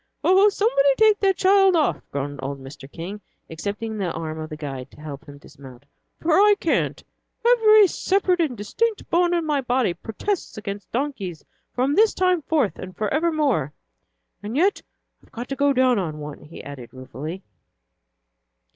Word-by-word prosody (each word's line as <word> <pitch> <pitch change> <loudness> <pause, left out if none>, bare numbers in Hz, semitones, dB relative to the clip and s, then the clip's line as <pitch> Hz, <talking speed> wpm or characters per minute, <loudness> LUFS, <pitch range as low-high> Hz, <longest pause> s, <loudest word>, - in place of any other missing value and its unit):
"Oh, 385 +3 +5
somebody 400 - +2
take 430 -1 +5
that 385 -2 +2
child 390 -1 +4
off," 310 -3 +1
groaned 140 0 -4
old 140 +1 -5
Mr. 135 +1 -11
King, 190 +5 -7 0.3
accepting 210 +6 -4
the 185 -4 -1
arm 160 -1 -5
of 155 0 -6
the 155 - -7
guide 135 -4 -6
to - - -18
help 145 -2 -8
him 145 0 -12
dismount, 135 -2 -14 0.3
"for 330 - -1
I 410 +4 +6
can't. - - 0 0.4
Every 435 -3 +6
separate 370 0 +1
and 275 -8 -1
distinct 435 - -2
bone 350 +1 +3
in 340 -2 -1
my 295 -3 0
body 245 -6 +1
protests 225 - -4
against 205 -1 -7
donkeys 225 - -4 0.3
from 260 +3 +1
this 435 +6 +4
time 365 -2 +2
forth 285 -8 0
and 185 0 -9
forevermore. 275 - 0 0.7
And 220 +5 -4
yet 380 +6 +2 0.4
I've - - -24
got 240 +2 -6
to 275 - -2
go 285 +1 +2
down 255 -3 +3
on 160 -5 -3
one," 150 -1 -8
he 155 - -11
added 135 -4 -9
ruefully. 145 - -7
240 Hz, 165 wpm, -23 LUFS, -, 0.7 s, I